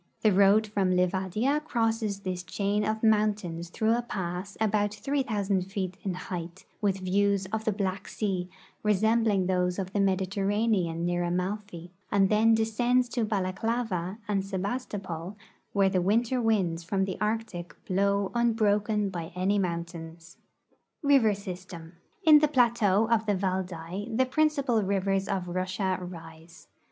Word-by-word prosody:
The 215 - +4
road 200 +3 +5
from 205 -3 0
Livadia 190 +9 +1
crosses 225 -6 -1
this 185 -2 -3
chain 200 +3 -1
of 220 +1 -2
mountains 210 -6 +1
through 220 +5 +1
a 240 - 0
pass 190 -3 -5
about 210 -1 +1
3,000 210 -6 0
feet 190 -3 -3
in 190 -3 -3
height, 175 -1 -6 0.2
with 195 -2 0
views 200 +1 +1
of 220 0 -2
the 220 - +2
Black 195 -1 -3
sea 185 -4 -2 0.3
resembling 215 -1 +2
those 180 -1 0
of 190 -1 -4
the 205 - 0
Mediterra 195 +2 +1
nean 170 -7 0
near 175 0 0
Amalfi, 180 0 -3 0.2
and 195 -1 +4
then 225 +1 +4
descends 240 +3 +1
to 240 -1 -1
Balaklava 200 -1 -2
and 200 -2 +1
Sebas 200 +6 -3
to])ol, 185 -2 -6 0.4
where 195 -1 +3
the 190 -1 +1
winter 230 +6 +1
winds 190 -7 +1
from 190 +3 0
the 190 -2 -5
Arctic 210 -5 -3
blow 200 +1 +1
unljroken 210 -3 +1
by 170 -3 -5
any 195 +3 +1
mountains. 170 -2 -5 0.7
EIVER 245 -7 +5
SYSTEM. 180 -3 -8 0.3
In 305 -2 +9
the 300 - +3
plateau 230 -6 +3
of 225 -1 +1
the 205 - +2
Valdai 185 0 -3
the 260 - +4
principal 280 -4 +1
rivers 195 0 0
of 185 -2 -2
Russia 185 +1 -1
rise. 165 -2 -11
200 Hz, 145 wpm, -28 LUFS, 185-220 Hz, 0.7 s, In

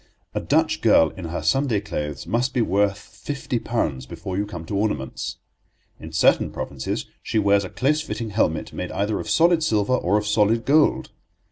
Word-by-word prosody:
A - - -1
Dutch - - +1
girl 80 - +5
in 95 - -8
her 85 +1 -4
Sunday 135 -6 +2
clothes 75 -9 -5
must 125 +3 -1
be 125 - +3
worth 100 0 +1
fifty 135 +2 -5
pounds 75 - -2
before 90 +6 -6
you 100 +2 -1
come 85 -5 -7
to 100 - -4
ornaments. 100 -10 -2 0.6
In 80 - -9
certain 80 - +3
provinces 65 -2 -4 0.2
she 115 - -2
wears 100 -1 +3
a 95 - -6
close 150 +4 +1
fitting 115 -7 -5
helmet, 80 -7 0
made - - -4
either 105 +2 -1
of - - -5
solid 170 0 +4
silver 110 -7 +1
or 105 -4 +2
of 105 - -1
solid 105 +2 +2
gold. 150 +2 +3
105 Hz, 180 wpm, -23 LUFS, 90-120 Hz, 0.6 s, girl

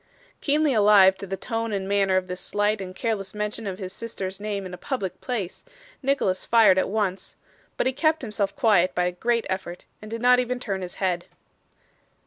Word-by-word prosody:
Keenly 295 0 +2
alive 205 -3 +6
to 195 - -7
the 195 +1 -3
tone 225 0 -3
and 195 -2 -2
manner 195 -1 +2
of 185 - 0
this 180 0 -6
slight 205 0 0
and 185 -1 -7
careless 205 -3 -3
mention 210 +1 -3
of 190 -1 -4
his 185 -1 -6
sister's 195 -5 -5
name 205 -2 -3
in 185 - -7
a - - -6
public 190 -8 -4
place, 215 -8 -4 0.4
Nicholas 265 -9 +1
fired 215 -5 +5
at - - 0
once; 195 -3 -2 0.4
but - - +1
he 260 - +1
kept 315 +2 +1
himself 205 -3 -2
quiet 205 -9 +3
by 180 - +2
a 180 - 0
great 230 +6 0
effort, 185 -2 -5 0.2
and 215 - -9
did 230 +1 -4
not 250 +1 +5
even 250 0 -1
turn 195 -6 -3
his 180 -1 -7
head. 180 -3 -1
200 Hz, 200 wpm, -25 LUFS, 190-230 Hz, 0.4 s, alive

